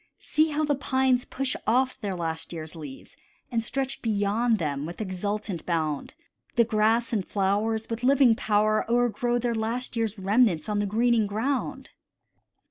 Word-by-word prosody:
See 310 +1 +1
how 305 +1 0
the 295 -1 +2
pines 260 -2 +1
push 270 0 -3
off 255 +3 +2
their 200 -3 -2
last 160 -2 -4
year's 160 -1 -6
leaves, 145 -4 -10 0.4
And 230 -2 0
stretch 270 +3 -3
beyond 220 +2 +1
them 145 -4 -2
with 170 - -8
exultant 200 -2 -3
bound: 155 -4 -1 0.4
The 235 - +6
grass 225 +1 +1
and 205 -4 +1
flowers, 210 +4 0
with 230 +1 -5
living 265 -2 +5
power, 215 -2 +2
o'ergrow 240 0 +1
Their 240 0 0
last 230 +3 -3
year's 225 -2 -1
remnants 200 -2 +2
on 210 -1 0
the 205 - 0
greening 225 +1 +2
ground. 240 +7 -2
220 Hz, 155 wpm, -26 LUFS, 200-245 Hz, 0.4 s, The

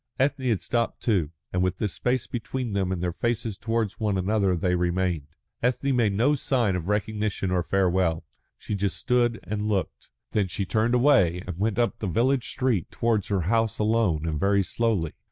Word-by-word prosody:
Ethne 135 -1 +1
had 110 -5 0
stopped, 115 -1 -1
too, 95 -10 +1 0.2
and 90 - +1
with 90 0 0
this 105 -4 -1
space 125 0 0
between 120 -1 -4
them 95 -2 0
and 90 -2 -2
their 90 - 0
faces 115 +1 -2
towards 115 0 -2
one 105 -3 0
another 95 0 +1
they 90 +2 0
remained. 90 -3 0 0.3
Ethne 125 +2 +1
made 110 -5 +2
no 120 +9 +3
sign 125 -8 +1
of 90 -1 -4
recognition 105 -2 -1
or 90 -1 +2
farewell. 90 -3 +1 0.3
She - - -5
just 100 -1 -1
stood 120 -2 +1
and 105 0 -3
looked. 100 -3 -2 0.2
Then 105 -3 +1
she 95 +2 -3
turned 110 +5 +1
away 120 - +4
and 90 -2 -6
went 110 +1 0
up 120 -1 0
the 110 - -2
village 125 +6 +1
street 125 - 0
towards 115 -4 0
her 100 -3 0
house 115 +5 +1
alone 105 -8 +1
and 75 -2 -2
very 100 +1 +3
slowly. 105 -6 0
105 Hz, 190 wpm, -26 LUFS, 90-115 Hz, 0.3 s, away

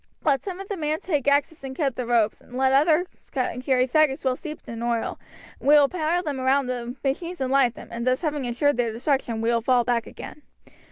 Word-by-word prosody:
Let 280 -3 +2
some 375 -2 -6
of 390 - -7
the 400 - -4
men 310 -1 -1
take 295 -7 -2
axes 285 +2 +1
and 265 -1 -6
cut 275 -6 0
the 250 -2 -4
ropes, 230 -3 +1
and 250 - -10
let 265 0 +3
others 310 +5 +4 0.3
carry 255 0 0
faggots 295 0 +2
well 260 -1 +2
steeped 305 +3 -9
in 230 0 -6
oil, 235 -1 -1 0.4
we - - -7
will 290 -1 +6
pile 350 0 0
them 290 -5 -3
round 265 +1 +2
the 245 -1 -4
machines 335 +6 -2
and 260 -1 -1
light 270 -3 +3
them, - - -11
and 235 +1 -4
thus 255 0 +2
having 295 -4 -1
ensured 245 +3 +1
their 235 -2 +1
destruction, 235 -1 -1
we 230 +1 +1
will 235 -1 +1
fall 245 +1 +3
back 235 -1 0
again." 300 - -10
265 Hz, 225 wpm, -24 LUFS, 245-300 Hz, 0.4 s, will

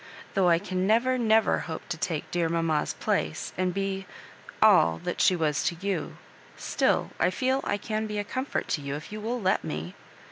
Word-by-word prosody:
Though 190 -2 +3
I 170 - +5
can 185 +2 -2
never, 250 +4 +3
never 220 -2 +3
hope 160 -2 -6
to 175 - -1
take 160 -3 -3
dear 170 -2 +1
mamma's 165 -2 0
place, 80 0 -1
and 185 0 0
be 195 0 -3 0.3
— - - -18
all 80 0 +6
— - - -15
that - - -2
she 185 - +5
was 155 -4 0
to 170 - +1
you, 190 -5 -3 0.4
still - - +1
I - - +4
feel 260 +7 0
I 205 - 0
can 215 +1 -3
be 210 0 -4
a 205 - 0
comfort 260 +6 -3
to 150 - 0
you 140 0 -4
if 150 +6 -8
you 215 0 -6
will 235 +3 -2
let 190 -3 +1
me. 80 +4 -5
185 Hz, 210 wpm, -27 LUFS, 160-215 Hz, 0.4 s, all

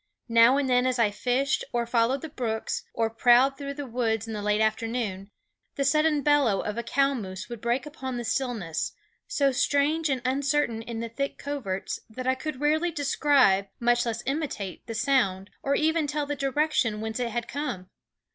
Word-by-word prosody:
Now 230 +3 +6
and 285 -1 +1
then 250 0 +3
as 255 -1 0
I 225 -3 +3
fished, 255 +6 0
or 240 -1 0
followed 235 +3 +1
the 320 - -5
brooks, 230 -6 -3
or 225 -1 0
prowled 245 +4 +5
through 280 0 -6
the 290 -1 -5
woods 225 -3 -1
in 225 - -5
the 210 - -4
late 210 +1 +1
afternoon, 220 -3 -1 0.5
the 280 - 0
sudden 305 0 +3
bellow 280 -9 +3
of 210 - -4
a 235 - -2
cow 275 +4 +1
moose 190 -5 -6
would 235 -2 -7
break 240 +3 0
upon 265 -4 -5
the 240 - -3
stillness, 225 -10 -2 0.3
so 280 -1 +2
strange 290 +4 +1
and 260 -3 -1
uncertain 270 -3 +1
in 225 0 -5
the 230 - -4
thick 275 +5 -3
coverts 250 -10 -4
that 255 +3 -7
I 260 - +3
could 265 +1 -5
rarely 310 +4 +2
describe, 280 - +3
much 240 0 +3
less 230 0 -3
imitate, 270 - -3
the 225 - -5
sound, 215 -6 +1
or 280 +1 +1
even 315 0 +1
tell 295 0 -1
the 290 0 -3
direction 275 -5 0
whence 220 +2 -4
it 245 -1 -1
had 235 +1 -3
come. 250 -11 -4
250 Hz, 190 wpm, -27 LUFS, 225-280 Hz, 0.5 s, Now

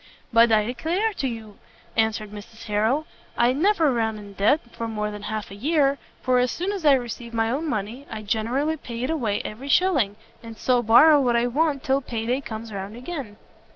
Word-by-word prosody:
"But 230 0 +6
I 215 -1 +4
declare 340 - -1
to 280 -8 -2
you," 220 -4 -7 0.4
answered 220 -2 0
Mrs 210 +2 -11
Harrel, 220 +8 0 0.3
"I 240 +1 +4
never 325 -1 +3
run 220 -2 0
in 205 -1 -11
debt 210 +10 +3
for 230 - -5
more 210 -1 -3
than 210 0 -8
half 215 0 -5
a - - -8
year, 280 +3 +1 0.2
for 255 -1 +3
as 250 0 +2
soon 360 +10 -2
as 395 -4 -5
I 285 - +8
receive 240 -2 -3
my 225 0 +1
own 305 +5 -2
money, 225 +5 -4
I 220 -1 -6
generally 240 +9 0
pay 235 -4 -6
it 265 - -1
away 230 -10 -1
every 250 +7 -7
shilling: 280 - +3 0.3
and 230 -1 -10
so 250 +1 +2
borrow 280 +7 +7
what 245 -3 +2
I 235 0 +3
want 280 +2 0
till 275 -2 +1
pay 230 -4 -4
day 250 +4 0
comes 225 -3 -7
round 200 +2 -6
again." 255 -6 -6
235 Hz, 205 wpm, -24 LUFS, 220-280 Hz, 0.4 s, I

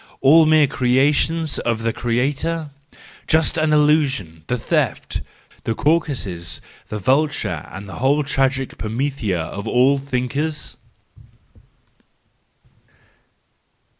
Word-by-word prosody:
All 155 +4 +6
mere 155 -1 +5
creations 140 +5 +1
of 115 -1 -1
the 115 0 0
creator?— 140 +6 -1 0.6
just 160 -1 +3
as 155 0 +2
the 150 - +4
illusion, 140 - +1
the 125 - 0
theft, 110 - -1 0.4
the 115 - -1
Caucasus, 105 - -1 0.3
the 105 - -4
vulture, 130 - 0
and 100 +1 -8
the 95 - -8
whole 140 +4 +2
tragic 135 -1 -1
Prometheia 115 -4 -2
of 100 +5 -5
all 130 +3 +3
thinkers 140 +3 -3
135 Hz, 105 wpm, -20 LUFS, 115-150 Hz, 0.6 s, All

